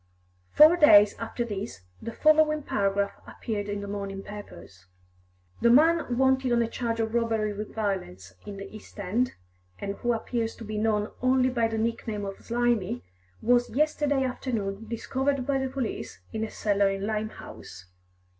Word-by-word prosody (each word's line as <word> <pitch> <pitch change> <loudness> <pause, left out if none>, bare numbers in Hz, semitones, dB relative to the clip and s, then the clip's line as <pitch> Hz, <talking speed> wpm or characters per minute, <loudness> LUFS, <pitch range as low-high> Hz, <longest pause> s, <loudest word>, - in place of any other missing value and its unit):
Four 310 +3 +7
days 210 -10 +7
after 230 +1 -3
this 195 - -5 0.2
the 230 - -5
following 305 +2 +3
paragraph 200 -4 0 0.2
appeared 205 -3 -4
in 205 0 -3
the 200 - -6
morning 200 -1 -5
papers: 95 - -11 0.7
"The 235 - +5
man 305 -1 +4
wanted 265 -1 +3
on 235 0 +3
a - - -1
charge 230 0 -3
of 220 0 -1
robbery 225 -3 0
with 210 +1 -7
violence 140 - -3
in 200 -1 -8
the 195 0 -7
East 215 - -13
End, 215 +6 0 0.4
and 200 0 -5
who 240 0 0
appears 230 0 -2
to - - -10
be 215 0 -4
known 210 -1 0
only 255 0 +3
by 235 -2 +1
the 225 0 -3
nickname 220 -2 -2
of 195 0 -7
Slimy, 235 - 0 0.4
was 245 +1 +3
yesterday 290 0 +1
afternoon 225 -5 -3
discovered 260 +4 -1
by 275 0 +1
the 265 0 -2
police 260 -3 -4
in 220 0 -2
a 220 - -3
cellar 200 -2 +1
in 195 0 -3
Limehouse. 215 - -6
225 Hz, 165 wpm, -27 LUFS, 205-250 Hz, 0.7 s, Four